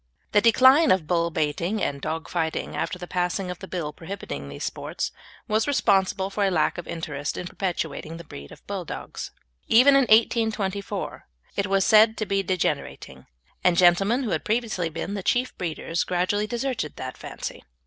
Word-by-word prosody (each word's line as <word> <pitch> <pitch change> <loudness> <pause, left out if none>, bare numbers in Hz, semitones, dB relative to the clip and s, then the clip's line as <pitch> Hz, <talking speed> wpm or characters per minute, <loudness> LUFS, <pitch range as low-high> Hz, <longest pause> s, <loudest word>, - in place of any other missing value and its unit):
The 205 - +5
decline 260 +7 +6
of 185 -4 +3
bull 170 +1 +1
baiting 165 +6 -1
and 140 -1 -2
dog 160 +2 -3
fighting 160 -2 -2
after - - -2
the 180 - -7
passing 180 +1 -1
of 180 - -8
the 190 - -8
Bill 165 -6 -4
prohibiting 160 - -7
these 70 - -7
sports - - -3 0.4
was 215 +1 +1
responsible 195 -7 +2
for 205 +1 0
a 195 - +3
lack 180 - +1
of 175 - -8
interest 145 -3 -4
in 180 - -4
perpetuating 165 -4 -4
the 170 - -9
breed 70 - -11
of - - -14
Bulldogs. - - -6 0.4
Even 255 +5 +7
in 275 -1 +5
1824 215 -3 +1 0.3
it 200 - 0
was 195 0 +2
said 220 +1 +6
to 215 - -1
be 195 -1 +1
degenerating, 170 - -3 0.4
and 180 -1 +4
gentlemen 195 +9 +4
who 230 - -2
had - - -1
previously 215 -6 -1
been 180 +5 -5
the 200 - -3
chief 245 +6 0
breeders 165 -1 -2
gradually 185 +4 0
deserted 240 - -3
the 130 0 -5
fancy. - - -7
185 Hz, 175 wpm, -25 LUFS, 165-215 Hz, 0.4 s, Even